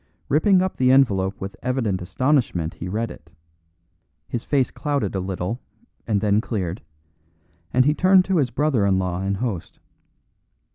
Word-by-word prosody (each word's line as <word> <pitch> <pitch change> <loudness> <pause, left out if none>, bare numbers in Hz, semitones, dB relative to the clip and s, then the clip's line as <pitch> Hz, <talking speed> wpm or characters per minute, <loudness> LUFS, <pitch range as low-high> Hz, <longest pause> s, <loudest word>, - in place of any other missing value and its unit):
Ripping 185 +6 +4
up 185 - -3
the 130 0 +4
envelope 100 -8 +3
with 95 +1 -6
evident 115 -7 -1
astonishment 95 - 0
he 90 - -7
read 110 +5 -2
it; 80 - -14 1.0
his 120 - -4
face 135 -4 +1
clouded 140 -9 -2
a 95 - -1
little, 95 +5 -3 0.5
and 105 -3 +1
then 105 0 +2
cleared, 95 -7 -3 0.9
and 130 0 +3
he 150 - +4
turned 185 +2 +4
to 190 -2 +1
his 135 -5 +2
brother 145 -7 +1
in 95 -1 +3
law 90 -1 -2
and 100 +1 -1
host. 105 -6 -4
115 Hz, 155 wpm, -23 LUFS, 95-135 Hz, 1.0 s, Ripping